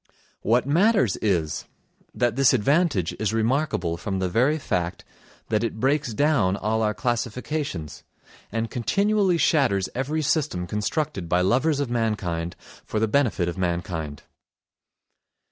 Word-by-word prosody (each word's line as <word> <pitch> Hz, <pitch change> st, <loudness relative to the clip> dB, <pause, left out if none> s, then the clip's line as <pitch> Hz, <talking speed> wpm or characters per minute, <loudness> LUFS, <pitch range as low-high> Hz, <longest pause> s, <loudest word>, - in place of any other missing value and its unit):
What 120 Hz, +3 st, +2 dB
matters 170 Hz, -, +3 dB
is, 85 Hz, -7 st, -1 dB, 0.5 s
that 120 Hz, -2 st, 0 dB
this 135 Hz, -1 st, +4 dB
advantage 135 Hz, -, +2 dB
is 110 Hz, 0 st, 0 dB
remarkable 115 Hz, -, 0 dB
from 95 Hz, +2 st, -3 dB
the 95 Hz, -1 st, -1 dB
very 130 Hz, -, +2 dB
fact 90 Hz, -, -2 dB, 0.4 s
that 110 Hz, 0 st, +1 dB
it 110 Hz, -1 st, -3 dB
breaks 135 Hz, -3 st, +1 dB
down 130 Hz, -11 st, +2 dB
all 110 Hz, +2 st, 0 dB
our 105 Hz, -1 st, +1 dB
classifications, 120 Hz, -, -3 dB, 0.5 s
and 115 Hz, +1 st, -2 dB
continually 195 Hz, -, +2 dB
shatters 125 Hz, -, +2 dB
every 150 Hz, +5 st, -1 dB
system 135 Hz, -, 0 dB
constructed 105 Hz, -, -2 dB
by 90 Hz, +1 st, +3 dB
lovers 135 Hz, -, +2 dB
of 140 Hz, -4 st, -2 dB
mankind 95 Hz, -8 st, -1 dB, 0.3 s
for 110 Hz, -, -2 dB
the 110 Hz, -, +2 dB
benefit 110 Hz, -7 st, +1 dB
of 85 Hz, +2 st, -4 dB
mankind. 85 Hz, -4 st, -3 dB
115 Hz, 130 wpm, -24 LUFS, 95-140 Hz, 0.5 s, this